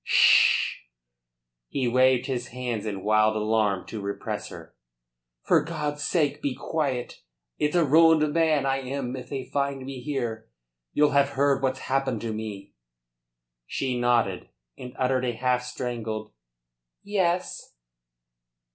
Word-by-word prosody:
"'Sh!" - - +5 0.9
He 130 - -1
waved 130 +1 +3
his 125 -2 -3
hands 120 -4 -4
in 100 -3 -4
wild 110 0 +3
alarm 105 -3 +1
to 110 - -6
repress 100 0 -4
her. - - -11 0.7
"For - - +4
God's 150 -2 -4
sake, 150 -3 0
be 140 -3 -2
quiet! 140 -6 -3 0.4
It's 150 +3 0
a 170 -2 +4
ruined 155 0 +5
man 160 -4 +2
I 135 0 +1
am 130 -1 -4
if 130 - -8
they 135 -2 -4
find 140 -2 -1
me 135 -2 -7
here. 120 -6 -4 0.4
You'll 150 0 +3
have 140 0 +3
heard 140 0 +2
what's 130 -1 -1
happened 135 -4 -1
to 115 -2 -3
me?" 105 -2 -7 0.9
She 130 -2 -2
nodded, 120 -6 +1 0.3
and 125 +1 -10
uttered 130 -1 +1
a 125 -1 -1
half 125 +1 0
strangled 115 -3 -5 0.7
"Yes." 185 - -1
130 Hz, 135 wpm, -26 LUFS, 115-140 Hz, 0.9 s, Sh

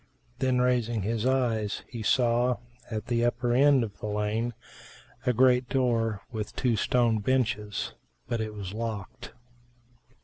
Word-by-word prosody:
Then 130 -1 +2
raising 120 -4 +1
his 115 +3 0
eyes, 115 -5 0
he 115 - -7
saw, 120 +2 +2 0.3
at 110 -2 -4
the 120 -1 0
upper 120 0 +1
end 135 0 +5
of 105 -3 -7
the - - -4
lane 105 +3 -1 0.7
a - - +5
great 125 +1 +4
doer 115 -5 +1
with 110 -3 -5
two 125 -3 +1
stone 115 +1 +2
benches; 120 -3 -1 0.3
but 120 -2 -1
it 110 -1 -4
was 100 -2 -6
locked. 110 -3 -5
115 Hz, 140 wpm, -28 LUFS, 110-125 Hz, 0.7 s, end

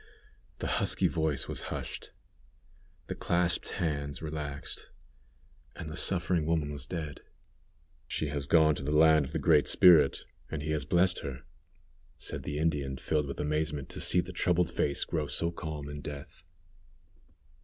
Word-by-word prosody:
The - - -5 0.2
husky 95 - +2
voice 80 -3 0
was - - -4
hushed, - - -5 1.0
the - - -4
clasped 85 -1 +1
hands 70 -4 -2
relaxed, 75 -3 -5 0.9
and 75 - -7
the - - -6
suffering 85 -3 +1
woman 80 -3 0
was 70 0 -5
dead! 80 -5 -5 0.9
"She 75 - -2
has 70 -1 -3
gone 80 -1 +5
to 75 - -5
the 70 - -3
land 80 -2 +6
of - - -9
the - - -1
Great - - +4
Spirit, 80 -6 +6 0.2
and 75 -2 -4
He 80 - -2
has 75 -3 -1
blessed 90 +3 +2
her," 65 -2 -6 0.7
said - - -4
the 75 - -4
Indian, 75 -4 -1
filled 75 0 -1
with 70 - -6
amazement 75 -2 -1
to - - -3
see 90 - +5
the 90 +1 -9
troubled 90 -1 +1
face 70 - 0
grow 75 -3 -2
so 85 +5 0
calm 80 -4 -6
in 75 0 -7
death. 70 0 -9
75 Hz, 155 wpm, -30 LUFS, 70-85 Hz, 1.0 s, land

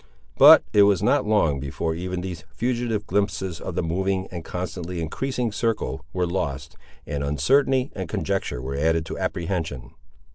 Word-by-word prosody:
But - - +9
it 105 - +6
was 100 -2 +4
not 105 - +2
long 85 -10 +2
before 75 +4 -3
even 90 +2 -4
these 90 -3 -6
fugitive 115 +2 -2
glimpses 95 -3 -1
of - - -5
the - - 0
moving, 95 +3 -1
and 85 -3 -6
constantly 90 0 -5
increasing 120 - -2
circle, 105 - -2
were 90 0 0
lost, 75 -5 -3 0.3
and 70 -1 -3
uncertainty 130 - +2
and 95 -4 -5
conjecture 60 - -2
were 70 +1 -4
added 80 +2 +1
to - - -6
apprehension. 85 -8 -3
90 Hz, 155 wpm, -24 LUFS, 80-105 Hz, 0.3 s, But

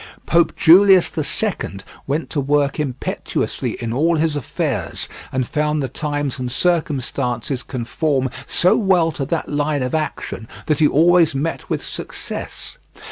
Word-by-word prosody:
Pope 170 +1 +3
Julius 190 +2 +6
the 155 - -3
Second 150 - -2 0.2
went 150 +4 -2
to 145 - 0
work 140 0 +1
impetuously 135 -4 -2
in 115 -1 -3
all 165 +6 +2
his 160 -1 +1
affairs, 145 - -2 0.2
and 130 -2 -1
found 150 -1 0
the - - -1
times 145 0 -3
and 125 -1 -3
circumstances 135 -5 0
conform 130 +2 -1 0.2
so 180 - +4
well 180 -6 +3
to 140 -3 -4
that 160 +3 -2
line 145 -1 0
of 125 - -3
action 155 -7 -3 0.2
that 155 -2 +1
he 155 - +6
always 165 +1 +4
met 155 +4 -3
with - - -2
success. - - -6
150 Hz, 145 wpm, -20 LUFS, 135-165 Hz, 0.2 s, Julius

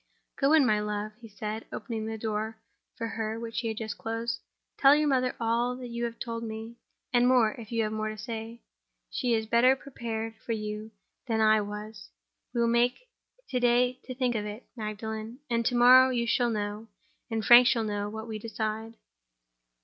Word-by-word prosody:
"Go 275 +2 +3
in, 310 -4 +6
my 215 -3 +3
love," 210 0 -3
he 230 - -10
said, 215 +1 -5
opening 225 -3 -4
the 220 0 -4
door 220 0 -3 0.4
for 230 - -3
her 225 0 -3
which 230 -1 -4
he 230 - -2
had 220 -1 -3
just 220 -2 -5
closed. 225 +1 -3 0.4
"Tell 275 +1 +7
your 300 0 +2
mother 255 -2 +1
all 240 +2 0
you 235 -1 -3
have 235 0 -5
told 230 -1 -4
me—and 230 +2 -2
more, 245 -4 +5
if 220 -1 -10
you 230 -1 +1
have 215 - -2
more 215 0 -2
to 215 - -6
say. 225 +1 -6 0.5
She 245 -2 +1
is 220 0 -1
better 235 +4 +5
prepared 230 -5 -5
for 230 - -2
you 210 0 -4 0.4
than 225 -2 0
I 215 0 +5
was. 210 +1 -7 0.4
We 240 -1 0
will 235 0 +3
take 245 - +1 0.4
to 250 - 0
day 245 +1 +3
to 255 - -6
think 250 -1 +1
of 215 -2 -1
it, 210 +4 -8
Magdalen; 220 +1 -5
and 235 0 +2
to 245 - 0
morrow 255 +2 +8
you 240 -2 0
shall 240 0 +2
know, 210 0 -3 0.4
and 225 -2 -2
Frank 240 +2 +9
shall 235 -3 +3
know, 205 -1 -2
what 220 +1 -7
we 220 -1 -5
decide." 220 0 -4
225 Hz, 190 wpm, -28 LUFS, 215-240 Hz, 0.5 s, Frank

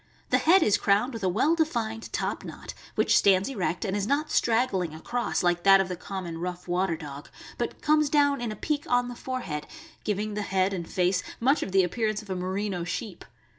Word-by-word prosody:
The - - +4
head 355 +2 +5
is 210 - +3
crowned 210 +6 +2
with 225 -3 -6
a 185 - +2
well 235 - +2
defined 235 -9 -1
top - - -2
knot, - - -8 0.2
which - - +3
stands 195 +3 +4
erect, 190 -6 -2
and 195 -1 -1
is 205 0 -1
not 295 +4 0
strag 240 +2 +2
gling 175 -5 -2
across, 240 +8 -2
like 175 0 +2
that 195 +1 +7
of 190 -1 0
the 180 - -3
common 175 -2 -6
rough 180 +1 -5
water 175 -1 0
dog, 145 -2 -9 0.3
but - - -4
comes 305 -1 +3
down 285 -2 +3
in 235 -2 -2
a - - -5
peak 295 +7 -2
on 245 0 +2
the 245 - -7
forehead, 240 - -4 0.4
giving 210 +1 -2
the 210 - -2
head 190 -1 +1
and 170 -3 -5
face 180 0 +1 0.2
much 270 +6 +3
of 195 - -3
the 190 0 +4
appearance 215 +3 -1
of 200 - -9
a - - -1
merino 185 0 -2
sheep. 185 +2 -5
200 Hz, 215 wpm, -27 LUFS, 180-245 Hz, 0.4 s, that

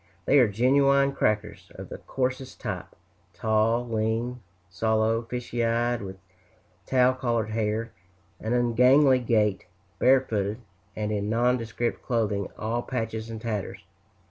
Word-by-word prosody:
They 145 - +5
are 125 - +6
genuine 140 +5 +3
"crackers," 105 -5 -2
of - - -9
the - - -8
coarsest 130 0 -3
type 95 -5 -4 0.5
tall, 110 +4 +1
lean, 115 +2 -1 0.3
sallow, 110 +3 +1
fishy 120 0 -4
eyed, 120 +1 +1
with 95 -1 -7 0.7
tow 130 -1 +4
colored 120 -4 -1
hair, 110 +1 -1 0.5
an 110 +2 -2
ungainly 125 +3 +4
gait, 105 -6 +1 0.3
barefooted, 110 -6 +2 0.4
and 105 0 -2
in 105 0 -2
nondescript 120 0 0
clothing 105 -5 -1
all 115 +2 -2
patches 115 -3 -4
and 110 -1 -6
tatters. 105 -5 -4
115 Hz, 120 wpm, -26 LUFS, 110-125 Hz, 0.7 s, are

